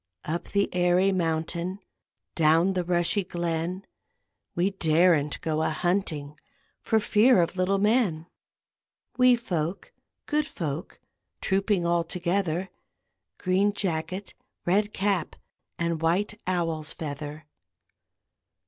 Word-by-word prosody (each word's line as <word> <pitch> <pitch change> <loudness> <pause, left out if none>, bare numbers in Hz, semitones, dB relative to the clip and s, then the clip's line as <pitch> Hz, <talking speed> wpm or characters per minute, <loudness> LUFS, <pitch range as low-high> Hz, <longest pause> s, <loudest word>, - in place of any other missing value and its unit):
Up 165 +3 -3
the 200 0 +1
airy 180 +2 +3
mountain, 170 +1 -1 0.5
Down 165 +4 +3
the 180 -1 0
rushy 175 +3 +2
glen, 175 +1 -3 0.7
We 180 +3 +1
daren't 160 -4 +2
go 155 -1 -1
a - - +1
hunting 155 -3 -2 0.4
For 220 - +2
fear 215 +2 +4
of 170 +1 +1
little 185 +1 +1
men; 205 -6 +2 0.9
Wee 250 -1 +7
folk, 185 - -3 0.3
good 300 -1 0
folk, 155 -2 -5 0.4
Trooping 195 -2 +1
all 170 0 +2
together; 180 +1 -1 0.7
Green 195 +2 +1
jacket, 185 0 -2 0.3
red 205 +4 +2
cap, 195 -5 -1 0.4
And 170 -1 -1
white 175 +6 +1
owl's 165 -4 -1
feather. 150 0 -6
175 Hz, 105 wpm, -26 LUFS, 165-195 Hz, 0.9 s, Wee